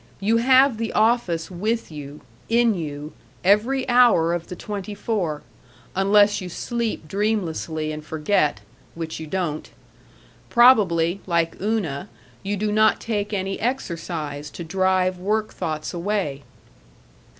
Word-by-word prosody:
You 215 +4 +2
have 260 0 +4
the 230 -1 -2
office 210 -7 +1
with 215 +3 -2
you, 145 -1 -9 0.3
in 235 0 +4
you, 150 -4 -6 0.3
every 235 +8 +3
hour 240 -10 +5
of 170 -1 -3
the 180 - -7
twenty 205 +1 -6
four, 180 -10 -2 0.5
unless 205 +2 +4
you 180 - -6
sleep 230 -4 -3
dreamlessly 170 -6 -1
and 155 0 -6
forget 150 - 0 0.3
which 160 -1 -5
you 160 - -7
don't. 165 -3 -3 0.8
Probably, 200 -8 +4
like 170 -2 +1
Una, 195 -10 -2 0.3
you 205 +1 -2
do 210 +1 -1
not 215 +1 +4
take 210 -2 -2
any 195 -1 -2
exercise 165 - -3
to 170 - -8
drive 185 +1 +1
work 215 +3 -1
thoughts 155 -1 -4
away. 175 -6 -2
190 Hz, 130 wpm, -23 LUFS, 160-215 Hz, 0.8 s, hour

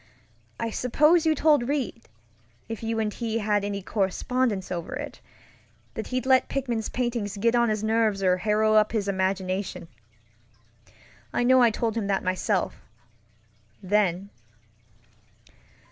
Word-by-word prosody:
I 230 -1 -2
suppose 300 +9 +3
you 315 - +3
told 290 -4 +3
Reid, 270 -5 -3 0.6
if 225 - -6
you 225 0 -2
and 215 -2 -1
he 230 -2 -2
had 210 -2 0
any 200 -1 -3
correspondence 205 +1 -1
over 170 -2 -4
it, - - -7 0.7
that - - -5
he'd 255 0 -2
let 260 -1 +3
Pickman's 240 -5 -2
paintings 235 -5 -2
get 230 +3 +2
on 235 -1 +3
his 215 -1 -1
nerves 220 -3 +1
or 180 -1 +3
harrow 215 +2 +2
up 215 0 +4
his 210 -3 -1
imagination. 190 -1 -2 1.4
I - - 0
know 255 +1 +5
I 240 - +6
told 225 0 -2
him 220 -3 -2
that 195 -1 0
myselfŌĆöthen. 120 - -3
215 Hz, 130 wpm, -26 LUFS, 190-235 Hz, 1.4 s, I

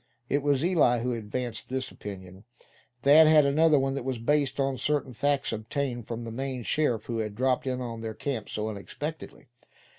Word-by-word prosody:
It 145 - +1
was 145 +1 +1
Eli 150 -10 +3
who 125 +1 -1
advanced 115 +1 -5
this 130 0 -2
opinion. 95 -1 -9 0.6
Thad 155 +3 +8
had 155 -2 +6
another 155 +2 +4
one 135 0 +1
that 140 - -3
was 130 -1 -2
based 140 +3 +1
on 135 -1 +1
certain 145 -2 -1
facts 140 +1 0
obtained 120 +2 -3
from 120 0 -5
the 115 - -6
Maine 130 +1 -4
sheriff 120 -5 0
who 115 -2 -3
had 105 -2 -3
dropped 130 +2 +1
in 130 -1 -1
on 115 -2 -5
their 110 -1 -5
camp 125 -5 -4
so 105 0 -3
unexpectedly. 120 - -7
130 Hz, 185 wpm, -28 LUFS, 115-140 Hz, 0.6 s, Thad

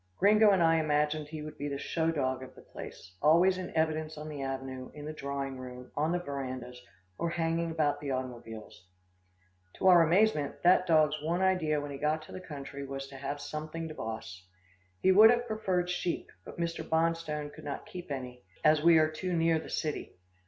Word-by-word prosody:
Gringo 210 +2 +6
and 190 -4 +4
I 165 0 +5
imagined 150 -1 +1
he 155 0 -7
would 155 0 -9
be 145 - -2
the 140 -1 -3
show 160 +3 -1
dog 130 -5 -1
of 130 0 -10
the - - -14
place 90 - -10
always 175 +5 +5
in 180 - -5
evidence 155 -1 0
on 155 +1 -6
the 145 -2 -6
avenue, 135 -1 -5
in 150 -1 -8
the 155 - -5
drawing 140 -2 -4
room, 125 0 -9
on 155 +3 +1
the 175 - +1
verandas, 130 -6 -5 0.4
or 170 - 0
hanging 165 0 0
about 155 -3 0
the 145 - -4
automobiles. 120 -7 -6 0.9
To - - -4
our 180 -2 +8
amazement, 165 -3 +3
that 180 +1 +5
dog's 155 -2 +3
one 170 +4 0
idea 170 -5 +2
when 145 0 -5
he 140 - -6
got 155 +1 0
to - - -13
the 185 - -7
country 140 -4 -7
was 135 0 -5
to 140 - -11
have 140 +2 -4
something 155 +2 -5
to - - -6
boss. 110 -7 -6 0.6
He 190 - +6
would 215 +4 +9
have 240 0 +3
preferred 190 -6 -1
sheep, 180 -1 -2
but - - -10
Mr. 170 0 -2
Bonstone 160 -2 -1
could - - -12
not 145 -1 -5
keep 180 -2 -9
any, 125 -3 -6 0.2
as 155 0 +5
we 165 +1 +7
are 155 0 +3
too 180 +3 -3
near 165 -1 +3
the - - -9
city. 155 -2 -3
155 Hz, 200 wpm, -30 LUFS, 140-170 Hz, 0.9 s, would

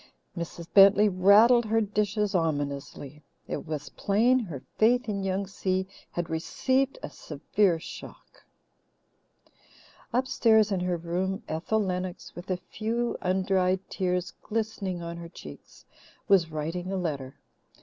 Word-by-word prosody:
Mrs. 170 -1 -6
Bentley 200 +1 +7
rattled 210 +6 +6
her 225 +1 +2
dishes 210 -1 0
ominously. 145 -3 -3 0.3
It - - -5
was 150 -2 -4
plain 235 +6 +2
her 170 - -6
faith 245 +3 +3
in 200 -2 -2
Young 195 +1 -1
Si 190 -1 -2 0.3
had 175 -1 -2
received 260 +12 0
a - - -4
severe 170 +4 0
shock. - - -11 1.7
Upstairs 230 -4 +3
in 190 - +1
her 180 -1 -1
room, 185 +5 -2
Ethel 175 +7 -1
Lennox, 180 -1 -4
with 175 +2 -10
a 185 - 0
few 230 +6 -3
undried 185 0 +1
tears 180 -1 -1
glistening 210 -5 -3
on 170 0 -6
her 170 0 -8
cheeks, 75 - -13 0.4
was 185 -5 +4
writing 165 +4 -4
a 195 - -1
letter. 140 -7 -4
190 Hz, 130 wpm, -27 LUFS, 170-210 Hz, 1.7 s, Bentley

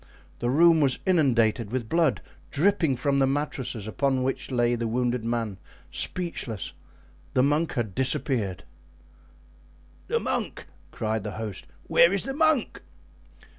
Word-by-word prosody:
The 120 - -1
room 165 +4 +5
was 135 -3 +3
inundated 120 - +2
with 125 -3 -2
blood, 165 +1 +1 0.3
dripping 160 -2 +2
from 140 +2 0
the 135 - +4
mattresses 135 -6 -2
upon 130 +3 0
which 135 - -2
lay 120 -2 +2
the 115 -1 -1
wounded 120 0 -1
man, 115 -4 -2 0.3
speechless; 165 - -2 0.6
the 125 - +4
monk 150 +4 +1
had 110 -5 -2
disappeared. 120 - -1 1.4
"The - - +1
monk!" - - -3 0.2
cried 110 -1 -2
the 105 -2 -5
host; 110 -3 -6 0.2
"where 170 - +5
is 200 -1 +1
the 270 - -4
monk?" 315 -3 +2
130 Hz, 135 wpm, -26 LUFS, 115-150 Hz, 1.4 s, room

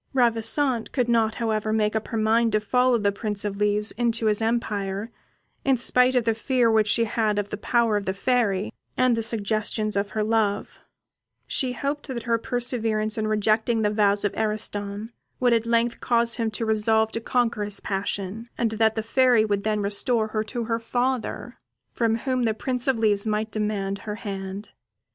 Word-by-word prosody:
Ravissante 235 +1 +2
could 250 -4 0
not, 225 -2 +2
however, 220 -2 -1
make 215 -1 +1
up 220 - -2
her 225 - -3
mind 225 +1 +2
to 215 - +3
follow 250 +3 +2
the 205 -2 +1
Prince 205 0 -4
of 200 -1 -3
Leaves 210 +1 +1
into 230 0 0
his 215 0 +2
empire, 215 -2 -2 0.5
in 270 -2 +3
spite 250 +2 +4
of 250 - +3
the 225 0 +1
fear 235 +1 +1
which 220 -1 +3
she 230 +3 +3
had 215 -1 0
of 205 -1 -2
the - - -3
power 230 0 +1
of 200 - -5
the 190 - -1
Fairy, 210 -3 0 0.2
and 255 -2 +3
the 230 - -1
suggestions 215 -1 -2
of 200 0 0
her 215 - +2
love; 215 -2 0 0.7
she 255 -2 -1
hoped 285 +3 -3
that 245 -4 -5
her 230 -1 +1
perseverance 225 -3 -1
in 215 -2 -1
rejecting 220 +2 +1
the 210 - +2
vows 205 -1 +2
of 205 - 0
Ariston, 210 0 -3 0.3
would 245 -2 +3
at 230 0 +1
length 235 0 +1
cause 235 -1 +1
him 230 -2 0
to 220 +1 -3
resolve 220 0 +2
to 230 - -3
conquer 235 -3 0
his 205 -1 -6
passion, 200 +3 -3
and 230 -2 0
that 220 0 +2
the 220 - -2
Fairy 245 -1 +3
would 205 -2 -1
then 215 -1 0
restore 215 +3 +1
her 215 0 -1
to 235 +2 -4
her 230 0 -1
father, 245 +1 -2 0.3
from 230 -2 +1
whom 255 +1 -1
the 220 -1 0
Prince 250 +2 -2
of 265 -3 +2
Leaves 210 -2 +1
might 215 +1 -1
demand 205 -2 -2
her 210 -1 -5
hand. 195 -1 -6
220 Hz, 190 wpm, -24 LUFS, 210-235 Hz, 0.7 s, spite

